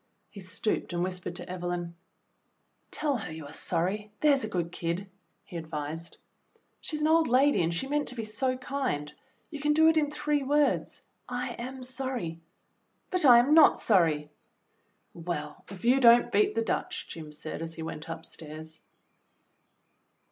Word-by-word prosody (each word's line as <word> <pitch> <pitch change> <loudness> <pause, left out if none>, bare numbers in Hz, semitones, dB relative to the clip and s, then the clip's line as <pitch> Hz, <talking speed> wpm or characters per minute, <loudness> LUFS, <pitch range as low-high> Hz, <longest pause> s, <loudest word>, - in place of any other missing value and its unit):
He 200 - -10
stooped 185 +1 -2
and 175 0 0
whispered 180 -1 -4
to 175 - -5
Evelyn, 175 -1 -4 0.5
" - - -46
Tell 295 -3 0
her 210 - -6
you 155 -1 -7
are 145 - -10
sorry, 190 +5 -1
there 295 -2 +6
's 270 - 0
a 215 - -3
good 175 -4 -2
kid," 175 +3 -3 0.4
he 175 - -7
advised. 160 +1 -5 0.6
"She's 305 -2 -4
an 305 - +3
old 325 0 +4
lady 265 -1 +4
and 165 0 +1
she 170 +9 -2
meant 290 +1 0
to 250 - -4
be 225 -2 -4
so 255 +4 -1
kind. 255 - -3 0.4
You 295 - -6
can 295 +1 +2
do 320 +1 +6
it 320 - +3
in 295 -2 +2
three 300 -1 0
words, 290 +2 +1 0.3
'I 245 0 -2
am 255 +2 -7
sorry.'" 250 -10 -4 0.7
"But 365 -4 +1
I 245 -3 +9
am 250 +5 +4
not 320 - +7
sorry." 160 -7 +2 0.8
"Well, 155 -3 -5
if 195 +1 -9
you 255 +3 +5
don't 240 -1 +6
beat 210 0 +3
the 225 - +1
Dutch," 365 +9 -2
Jim 155 -2 -8
said, 150 +1 -7
as 165 0 -6
he 160 - -6
went 160 0 -6
upstairs. 160 -1 -8
210 Hz, 170 wpm, -29 LUFS, 165-270 Hz, 0.8 s, I